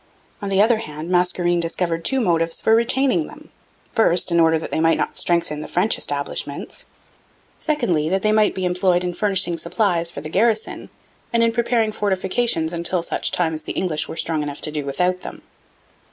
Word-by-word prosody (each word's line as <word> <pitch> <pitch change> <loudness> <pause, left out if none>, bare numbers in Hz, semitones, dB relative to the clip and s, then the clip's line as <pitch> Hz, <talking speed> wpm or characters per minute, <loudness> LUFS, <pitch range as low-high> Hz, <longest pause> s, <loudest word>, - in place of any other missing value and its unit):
On 200 - -3
the 195 +1 +4
other 225 +1 +3
hand, 155 -3 -6
Mascarene 175 -1 +1
discovered 165 0 -2
two 265 - +1
motives 165 -6 +1
for 220 - +2
retaining 265 +6 +2
them: - - -14 0.4
first, 180 -5 +3
in 170 - +3
order 160 -1 +4
that 160 - -6
they - - -1
might 165 0 +3
not - - -2
strengthen 170 -3 +1
the - - -7
French 185 +5 +2
establishments; 140 0 -3 0.7
secondly, 195 - 0
that 190 +1 0
they 215 - +3
might 215 -1 +3
be 185 - -2
employed 180 0 +1
in 180 -1 -2
furnishing 190 -4 +1
supplies 175 -4 0
for 140 - -7
the 155 - -6
garrison 215 +5 0 0.4
and 235 -1 +3
in 230 - +3
preparing 230 -1 +1
fortifications 190 -3 0
until 170 +1 -1
such - - -2
time 165 -3 0
as 155 - -4
the - - -6
English 165 -5 -1
were - - -8
strong 160 -2 -1
enough 145 -1 -5
to 155 - -4
do 150 -2 -4
without 180 +5 0
them. - - -9
180 Hz, 190 wpm, -21 LUFS, 165-215 Hz, 0.7 s, the